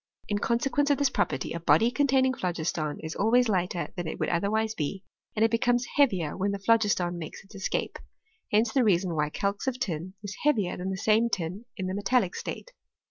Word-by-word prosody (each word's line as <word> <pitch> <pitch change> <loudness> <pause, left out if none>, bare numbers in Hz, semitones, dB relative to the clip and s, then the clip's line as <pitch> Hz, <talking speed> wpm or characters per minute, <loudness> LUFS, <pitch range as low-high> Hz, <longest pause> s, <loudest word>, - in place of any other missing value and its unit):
In 205 -1 0
consequence 275 +6 +1
of 285 - +3
this 280 -2 +2
property, 135 - -1
a 170 - -3
body 170 +8 +4
containing 265 -1 +3
phlogiston 165 - -2
is 160 0 -5
always 240 +4 +3
lighter 180 -3 -1
than 175 -3 -4
it - - -5
would - - 0
otherwise 215 +5 0
be^ 185 +2 -4 0.3
and 220 +1 +4
it 225 - +1
becomes 245 +1 +2
heavier 190 - +2
when 195 +1 0
the 200 - -2
phlogiston 200 -5 +2
makes 160 +3 -8
its 195 - -18
escape: 195 -2 -3 0.5
hence 220 +1 +2
the 265 - +3
reason 185 -4 +2
why 150 -1 0
calx 200 - -2
of 255 -1 0
tin 185 -4 -3
is 200 0 -6
heavier 220 -12 +2
than 185 +1 -4
the 190 - -3
same 220 +4 +3
tin 185 +3 -3
in 190 - -3
the 185 - -2
metallic 205 0 +1
state. - - -6
200 Hz, 200 wpm, -28 LUFS, 175-235 Hz, 0.5 s, body